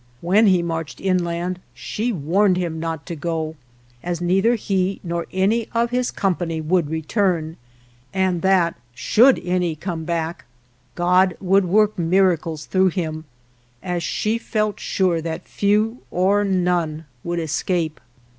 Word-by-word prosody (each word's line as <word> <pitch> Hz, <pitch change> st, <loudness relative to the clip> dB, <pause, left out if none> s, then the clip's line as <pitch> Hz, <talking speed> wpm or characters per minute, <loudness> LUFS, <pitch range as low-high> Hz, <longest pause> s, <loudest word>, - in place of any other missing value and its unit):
When 200 Hz, +6 st, +4 dB
he 185 Hz, -3 st, +4 dB
marched 165 Hz, -2 st, -4 dB
inland 180 Hz, -1 st, -1 dB, 0.2 s
she 215 Hz, -, -3 dB
warned 185 Hz, +2 st, +2 dB
him 170 Hz, -3 st, -2 dB
not 165 Hz, -2 st, -4 dB
to 170 Hz, -, -5 dB
go, 160 Hz, 0 st, -3 dB, 0.5 s
as 175 Hz, -1 st, -3 dB
neither 190 Hz, +7 st, +2 dB
he 195 Hz, -3 st, -1 dB
nor 170 Hz, -1 st, -3 dB
any 210 Hz, +5 st, +1 dB
of 235 Hz, +1 st, +1 dB
his 250 Hz, 0 st, 0 dB
com 195 Hz, -4 st, 0 dB
pany 165 Hz, -2 st, -3 dB
would 160 Hz, 0 st, +1 dB
return, 160 Hz, 0 st, 0 dB, 0.6 s
and 185 Hz, -3 st, 0 dB
that, 185 Hz, -3 st, +3 dB, 0.2 s
should 235 Hz, -, +5 dB
any 180 Hz, -2 st, 0 dB
come 165 Hz, 0 st, -4 dB
back, 165 Hz, -2 st, -3 dB, 0.5 s
God 180 Hz, +1 st, +3 dB
would 195 Hz, 0 st, +3 dB
work 210 Hz, +2 st, +2 dB
miracles 170 Hz, -3 st, +1 dB
through 190 Hz, 0 st, +3 dB
him, 160 Hz, -3 st, -4 dB, 0.6 s
as 180 Hz, -1 st, -2 dB
she 215 Hz, +6 st, -1 dB
felt 215 Hz, -2 st, -1 dB
sure 180 Hz, -4 st, 0 dB
that 160 Hz, 0 st, -5 dB
few, 215 Hz, +4 st, +1 dB
or 195 Hz, +3 st, +2 dB
none, 175 Hz, -5 st, 0 dB, 0.2 s
would 175 Hz, 0 st, -2 dB
escape. 160 Hz, 0 st, -1 dB
180 Hz, 140 wpm, -21 LUFS, 165-195 Hz, 0.6 s, should